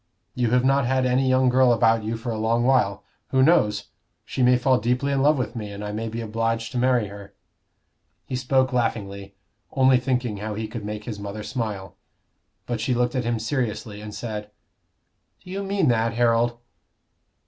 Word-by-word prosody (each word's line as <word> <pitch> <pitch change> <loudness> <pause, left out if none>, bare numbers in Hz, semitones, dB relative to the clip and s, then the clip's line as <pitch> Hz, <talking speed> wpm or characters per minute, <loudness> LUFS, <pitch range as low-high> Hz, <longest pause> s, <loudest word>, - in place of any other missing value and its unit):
You 120 -2 0
have 125 +2 +2
not 135 -1 +3
had 130 0 +1
any 130 +1 +2
young 130 0 +3
girl 125 0 +4
about 115 -1 +3
you 110 +2 -2
for 115 +1 -4
a 110 - -3
long 115 +2 +1
while. 110 -7 +2 0.2
Who 130 -1 +3
knows? 120 -10 +2 0.4
she - - -4
may 125 0 +5
fall 130 +1 +2
deeply 125 +5 0
in 135 -1 +1
love 150 +2 +4
with 125 -4 -3
me, 105 -3 -5
and 100 +1 -6
I 105 - -4
may 110 +2 -3
be 115 +1 -4
obliged 115 +1 -2
to 125 - -2
marry 125 -3 +2
her." 100 0 -11 0.9
He 130 - -4
spoke 130 +1 +1
laughingly, 100 -5 -2 0.4
only 130 -1 +4
thinking 125 -4 -1
how 105 +1 -4
he 110 +1 -3
could 110 0 -7
make 105 0 -5
his 105 -2 -6
mother 100 +1 -6
smile. 100 -7 -4 0.7
But 120 -2 -3
she 125 +2 0
looked 120 +1 +1
at 130 -3 -1
him 120 0 0
seriously 110 -3 -3
and 105 0 -7
said, 105 -1 -6 0.9
"Do 180 - -11
you 195 +1 -3
mean 200 0 0
that, 115 -1 +1
Harold?" 120 0 +2
115 Hz, 190 wpm, -24 LUFS, 105-130 Hz, 0.9 s, may